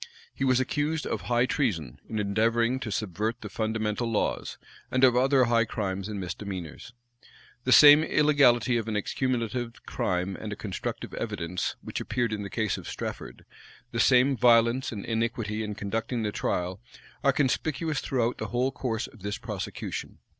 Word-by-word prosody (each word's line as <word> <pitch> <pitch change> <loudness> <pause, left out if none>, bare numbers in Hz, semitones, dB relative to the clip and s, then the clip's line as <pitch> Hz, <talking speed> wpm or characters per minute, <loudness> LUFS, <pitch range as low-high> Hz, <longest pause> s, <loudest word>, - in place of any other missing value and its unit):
He - - -4
was 130 -1 +3
accused 150 +3 -1
of - - -2
high 120 0 +2
treason, 90 - -1
in 110 - -3
endeavoring 115 +4 +1
to 115 -4 -5
subvert 110 +4 -2
the - - -6
fundamental 110 +1 -1
laws, 110 - -1 0.3
and 130 0 +1
of 125 -2 +6
other 130 +1 +4
high 115 -1 +3
crimes 100 -3 -3
and 105 -2 -4
misdemeanors. 95 +1 -6 0.7
The 130 - +1
same 150 +3 +9
illegality 135 -6 +4
of 115 -1 -3
an 110 - -2
accumulative 120 +1 -2
crime 90 +1 -1
and 110 - -6
a - - -3
constructive 100 -2 -5
evidence 85 +2 -3
which - - -4
appeared 120 -3 -1
in 105 - -3
the 100 - -5
case 110 0 -1
of - - -8
Strafford, - - -6 0.5
the - - -3
same 130 +2 +5
violence 120 +1 +4
and 100 -4 -6
iniquity 115 -2 -1
in 105 -1 -4
conducting 110 +3 -2
the 105 - -1
trial, 90 0 -2 0.4
are 140 - +5
conspicuous 150 +2 0
throughout 125 -3 -1
the - - -3
whole 125 +2 0
course 120 -3 -2
of 115 - -15
this 105 +3 -3
prosecution. 105 -5 -5
115 Hz, 165 wpm, -27 LUFS, 105-125 Hz, 0.7 s, same